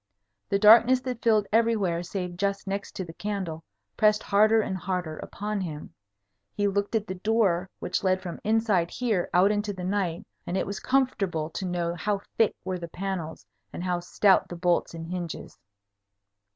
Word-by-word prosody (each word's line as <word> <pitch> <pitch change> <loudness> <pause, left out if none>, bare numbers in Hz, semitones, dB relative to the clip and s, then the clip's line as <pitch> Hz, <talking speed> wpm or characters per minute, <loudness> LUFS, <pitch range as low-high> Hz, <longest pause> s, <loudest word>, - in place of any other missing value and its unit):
The 200 - +2
darkness 230 +5 +7
that 250 -2 -5
filled 215 -3 +3
everywhere 215 -7 +2
save 180 0 -4
just 200 +2 -1
next 200 +1 -4
to 190 - -4
the 165 - -10
candle, 185 -5 -4 0.3
pressed 215 -1 +3
harder 215 +2 +4
and 200 -3 -1
harder 180 -4 -3
upon 210 0 -4
him. 155 -5 -6 0.6
He 205 -1 +1
looked 200 +2 -1
at 215 -2 +1
the 185 - -4
door 190 -2 +1
which - - -2
led 185 -1 +2
from 180 -2 -7
inside 215 -6 +2
here 220 -6 -1
out 185 +3 +4
into 205 0 -1
the 185 -1 -7
night, 185 -3 -1 0.2
and 180 - -1
it - - 0
was 200 - -5
comfortable 195 -12 0
to 185 +3 -4
know 175 -1 -1
how 200 +3 -1
thick 225 - +3
were 185 -1 -2
the 170 - -6
panels 175 - -5 0.3
and - - -6
how 180 -1 0
stout 190 +2 +3
the 175 - -6
bolts 175 -1 0
and 165 0 -6
hinges. 175 -1 -6
195 Hz, 180 wpm, -27 LUFS, 175-210 Hz, 0.6 s, darkness